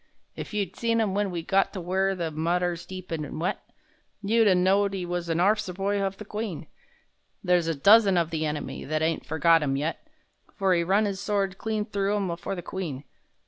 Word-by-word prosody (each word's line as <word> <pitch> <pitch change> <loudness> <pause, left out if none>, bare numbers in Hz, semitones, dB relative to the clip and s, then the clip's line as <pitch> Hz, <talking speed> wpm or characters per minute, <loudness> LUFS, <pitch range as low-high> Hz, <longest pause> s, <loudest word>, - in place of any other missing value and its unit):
If - - -7
you'd 200 -4 -2
seen 230 -1 0
him 210 -4 +1
when 205 0 0
we 170 -2 -4
got 195 +3 +1
to 195 - -4
where 190 +2 0
The 170 -3 -3
Modder's 170 +2 -1
deep 185 -2 -8
an' 155 -2 -4
wet, 170 +3 -2 0.6
You'd 225 +2 +3
a 190 - +5
knowed 195 +2 +2
'e 185 -2 -3
was 175 -1 -3
a' - - +2
orf'cer 200 +1 +1
hof 195 0 -2
the 210 - -9
Queen! 205 -7 -5 0.8
There's 180 -3 +2
a 165 - 0
dozen 200 +5 +6
of 170 -1 +1
the 160 -1 -1
enemy 150 -1 -4
That 155 +2 -1
ain't 160 -5 -1
forgot 160 +2 +4
'im 135 -2 0
yet— 155 - -3 0.5
For 195 -2 +2
'e 170 - +2
run 195 +5 +2
'is 195 -2 -3
sword 200 -2 -1
clean 215 -1 -2
through 200 -1 -1
'em 190 -4 -1
for 175 - -5
the 175 - -6
Queen! 160 -8 -5
185 Hz, 205 wpm, -26 LUFS, 165-200 Hz, 0.8 s, dozen